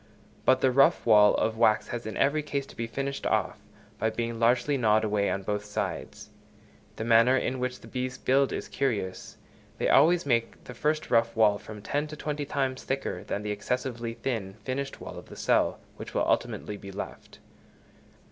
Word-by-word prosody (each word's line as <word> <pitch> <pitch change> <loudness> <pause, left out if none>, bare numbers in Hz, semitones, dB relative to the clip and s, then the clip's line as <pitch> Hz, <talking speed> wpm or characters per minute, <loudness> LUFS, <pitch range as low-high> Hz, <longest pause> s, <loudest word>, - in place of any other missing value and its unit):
But 130 0 +4
the 130 - +4
rough 135 +2 +4
wall 105 -2 +6
of 110 - 0
wax 110 -2 +3
has 120 -2 -4
in 110 - -5
every 145 +2 +2
case 140 -2 -3
to - - -15
be 115 - -3
finished 140 +4 -3
off, - - 0 0.4
by 110 - +1
being 115 +1 -3
largely 120 +5 +3
gnawed 110 -4 +3
away 105 -2 +1
on 100 - -2
both 105 +1 -2
sides. 105 0 -5 0.6
The - - -4
manner 115 +3 +5
in 130 0 -1
which 125 0 -3
the - - -12
bees 125 0 -4
build 135 +1 +2
is - - -4
curious; 105 -9 -3 0.4
they - - 0
always 170 0 +5
make 120 -4 0
the 125 - -9
first 155 +5 -1
rough 115 0 +3
wall 105 -2 +4
from 105 -1 -10
ten 145 +5 -1
to 150 - -8
twenty 150 -1 -3
times 135 -2 -2
thicker 135 +1 -3
than 105 - -4
the 105 - -2
excessively 120 +1 -3
thin 115 -6 -3
finished 135 +3 -4
wall - - -8
of - - -15
the - - -10
cell, - - +1 0.2
which - - -9
will - - +2
ultimately 105 - -1
be 100 -1 -9
left. 100 +2 -8
120 Hz, 190 wpm, -28 LUFS, 110-135 Hz, 0.6 s, wall